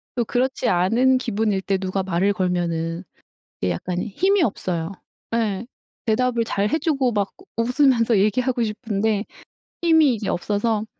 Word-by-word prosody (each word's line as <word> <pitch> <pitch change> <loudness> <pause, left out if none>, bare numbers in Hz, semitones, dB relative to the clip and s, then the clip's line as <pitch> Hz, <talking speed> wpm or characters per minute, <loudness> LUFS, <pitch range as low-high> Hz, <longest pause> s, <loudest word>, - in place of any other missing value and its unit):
또 240 -2 0
그렇지 260 +3 0
않은 230 +9 +3
기분일 215 -4 0
때 195 0 0
누가 190 0 -2
말을 190 +2 +1
걸면은 175 -3 -1 0.6
예 90 - +1
약간 175 - -3
힘이 380 - +1
없어요. 175 - -2 0.4
예. 220 -2 -1 0.4
대답을 235 +1 +1
잘 205 -2 0
해 315 - +1
주고 285 -5 +1
막 200 -2 -1 0.3
우 - - +3
웃으면서 245 -3 +3
얘기하고 240 +5 +1
싶은데 215 -1 -1 0.6
힘이 320 -6 +5
이제 210 -2 -5
없어서 210 +4 0
215 Hz, 290 characters per minute, -22 LUFS, 190-250 Hz, 0.6 s, 힘이